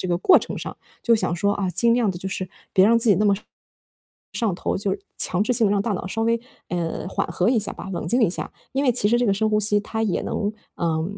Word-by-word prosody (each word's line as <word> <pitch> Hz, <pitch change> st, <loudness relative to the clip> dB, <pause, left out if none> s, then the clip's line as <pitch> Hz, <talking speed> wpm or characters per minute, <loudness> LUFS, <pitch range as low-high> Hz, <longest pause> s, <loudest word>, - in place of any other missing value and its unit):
这 -, -, -3 dB
个 175 Hz, -, +1 dB
过 365 Hz, -, +6 dB
程 -, -, -6 dB
上。 -, -, -6 dB, 0.3 s
就 235 Hz, -, +4 dB
想 175 Hz, -5 st, 0 dB
说 200 Hz, +4 st, +1 dB
啊， 195 Hz, -2 st, -2 dB
尽 230 Hz, +7 st, +3 dB
量 235 Hz, -5 st, +2 dB
地 175 Hz, -, -6 dB
就 190 Hz, -, -5 dB
是 185 Hz, -1 st, -4 dB, 0.2 s
别 190 Hz, 0 st, +5 dB
让 230 Hz, +1 st, +5 dB
自 230 Hz, -, +1 dB
己 200 Hz, -, +6 dB
那 210 Hz, -, +1 dB
么 200 Hz, -, +4 dB
上 205 Hz, -, -9 dB
上 -, -, -47 dB, 1.5 s
头， -, -, -25 dB
就 -, -, -34 dB
是 -, -, -49 dB
强 185 Hz, +2 st, +1 dB
制 250 Hz, -, +1 dB
性 225 Hz, -3 st, +3 dB
地 -, -, +1 dB
让 200 Hz, -, +2 dB
大 220 Hz, -, -1 dB
脑 185 Hz, -, -4 dB
稍 225 Hz, +4 st, -2 dB
微， 230 Hz, +1 st, +2 dB, 0.3 s
呃， 170 Hz, 0 st, -3 dB
缓 -, -, -2 dB
和 185 Hz, +5 st, 0 dB
一 245 Hz, -, +3 dB
下 210 Hz, -, -2 dB
吧， -, -, -9 dB
冷 170 Hz, -, -4 dB
静 245 Hz, +2 st, +2 dB
一 205 Hz, -, +4 dB
下。 -, -, -4 dB, 0.2 s
因 270 Hz, +2 st, 0 dB
为 255 Hz, -, +4 dB
其 210 Hz, -3 st, +3 dB
实 240 Hz, +2 st, +3 dB
这 245 Hz, -, +1 dB
个 200 Hz, -, +3 dB
深 215 Hz, +2 st, +1 dB
呼 210 Hz, 0 st, +2 dB
吸 210 Hz, 0 st, +2 dB
它 220 Hz, +2 st, -4 dB
也 205 Hz, -5 st, 0 dB
能 205 Hz, +1 st, -2 dB, 0.2 s
呃， 160 Hz, -2 st, 0 dB
205 Hz, 305 characters per minute, -23 LUFS, 185-230 Hz, 1.5 s, 过